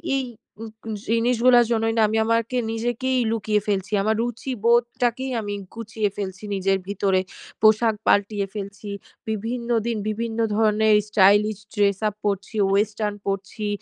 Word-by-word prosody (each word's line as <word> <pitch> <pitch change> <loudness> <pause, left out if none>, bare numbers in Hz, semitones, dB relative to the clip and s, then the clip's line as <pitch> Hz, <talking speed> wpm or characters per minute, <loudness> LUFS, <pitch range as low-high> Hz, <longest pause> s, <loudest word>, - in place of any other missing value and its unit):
এই 270 - 0 0.9
জিনিসগুলার 240 +1 +4
জন্যই 225 0 +1
না - - +4
আমি, 220 +1 -1
আমাকে 230 +2 0
নিজেকেই 240 +3 -1
লুকিয়ে 215 -2 0
ফেলছি। 195 0 -1
আমার 220 +1 +1
রুচিবোধটাকেই 240 +1 0
আমি 205 -1 -4 0.2
গুচিয়ে 220 -2 -2
ফেলছি 190 0 -5
নিজের 195 0 +1
ভিতরে। 195 -2 +1 0.4
পোশাক 220 +1 +4
পালটিয়ে 205 0 +2
ফেলছি, 200 0 -7 0.4
বিভিন্ন 235 +3 -3 0.2
দিন 230 -2 -1
বিভিন্ন 230 +1 -3 0.2
ধরনের 215 0 +3
স্টাইলিশ 205 +1 +4 0.2
ড্রেস 200 -2 +2
আপ 210 - -3
পরছি, 200 +1 -2
ওয়েস্টার্ন 210 +1 0
পরছি 195 +2 -3
215 Hz, 125 wpm, -23 LUFS, 205-230 Hz, 0.9 s, জিনিসগুলার